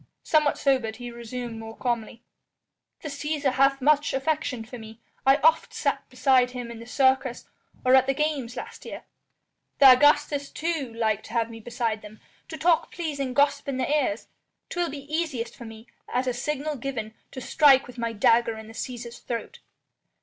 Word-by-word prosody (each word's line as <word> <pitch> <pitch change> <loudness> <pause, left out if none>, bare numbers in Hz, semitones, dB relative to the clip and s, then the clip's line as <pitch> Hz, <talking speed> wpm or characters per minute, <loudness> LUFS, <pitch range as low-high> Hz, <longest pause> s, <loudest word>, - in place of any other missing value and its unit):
Somewhat 305 -2 +2
sobered, 255 -6 +1
he 245 0 -7
resumed 235 0 -6
more 225 0 -9
calmly: 235 -1 -3 0.8
"The - - -4
Cæsar 290 -1 -1
hath 275 +1 +3
much 295 0 +3
affection 270 -4 -1
for 245 +1 -9
me. 220 0 -11 0.3
I 270 - +8
oft 320 +1 +3
sat - - -1
beside 255 -3 +3
him 245 -2 -6
in 230 - -9
the 230 - -11
Circus 260 -1 +1 0.4
or 255 - +5
at 260 0 +6
the 270 - +1
games 285 -5 -1
last - - -8
year. - - -8 0.7
The 270 -2 +9
Augustas 290 +1 +3
too 315 -6 -2
like 220 -2 0
to 220 - -11
have 230 -1 0
me 225 - -9
beside 230 -1 -2
them, 210 +1 -12 0.3
to 320 - -7
talk 330 +1 +2
pleasing 280 -6 -3
gossip 285 0 +2
in 275 -2 -2
their 260 - -1
ears. 270 -8 0 0.4
'Twill 350 -2 -1
be 280 0 -7
easiest 270 -9 -2
for 240 - -10
me, 225 0 -11 0.3
at 250 +2 0
a 250 - 0
signal 295 +3 -3
given, 235 -4 -5 0.2
to - - -8
strike 270 +1 +5
with 250 0 -11
my 230 -1 -1
dagger 230 +1 +3
in 220 - -9
the 225 - -12
Cæsar's 240 0 -6
throat." 235 -1 -6
255 Hz, 180 wpm, -26 LUFS, 230-285 Hz, 0.8 s, The